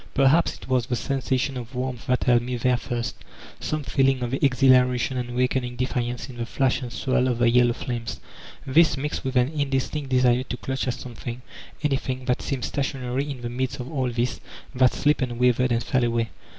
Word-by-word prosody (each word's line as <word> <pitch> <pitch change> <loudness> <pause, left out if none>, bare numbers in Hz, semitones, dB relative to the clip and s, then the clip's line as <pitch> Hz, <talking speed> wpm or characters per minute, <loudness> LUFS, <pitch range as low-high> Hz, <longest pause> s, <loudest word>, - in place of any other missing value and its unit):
Per 135 -1 +5
haps 165 +4 +3
it - - -12
was 130 -3 +1
the 125 - 0
sensation 135 +1 -1
of 120 +1 -8
warmth 125 -1 -4
that 125 0 +1
held 120 -1 +4
me 125 +1 -3
there 125 +1 +2
first, 120 -1 -3 0.4
some 155 -1 -2
feeling 135 -2 +2
of 120 +1 -3
exhilaration 130 -1 +3
and 120 -1 -3
wakening 125 0 0
defiance 125 -1 -2
in 125 -3 -10
the 120 - -2
flash 135 +2 +1
and 125 -2 -6
swirl 130 0 +1
of 125 -2 0
the 120 -1 +3
yellow 120 0 +4
flames 115 -5 -5 0.2
— - - -17
this, 150 +2 +4
mixed 150 +2 -3
with 130 0 -3
an 125 +1 +4
indistinct 140 -1 -2
desire 125 -1 +3
to 125 -1 -5
clutch 130 +1 -3
at 125 - 0
some 125 - -9
thing, 120 +2 -7 0.4
anything, 130 -3 -1
that 125 -1 0
seemed 135 -3 -2
stationary 135 0 -2
in 135 -3 -6
the 120 - -4
midst 130 +3 -3
of 125 +3 -6
all 130 -4 0
this 120 0 -1 0.3
that 130 -1 +4
slipped 150 0 +1
and 120 -2 -2
wavered 125 0 +3
and 115 0 +1
fell 130 +1 +1
away 115 -1 0
125 Hz, 210 wpm, -24 LUFS, 120-135 Hz, 0.4 s, Per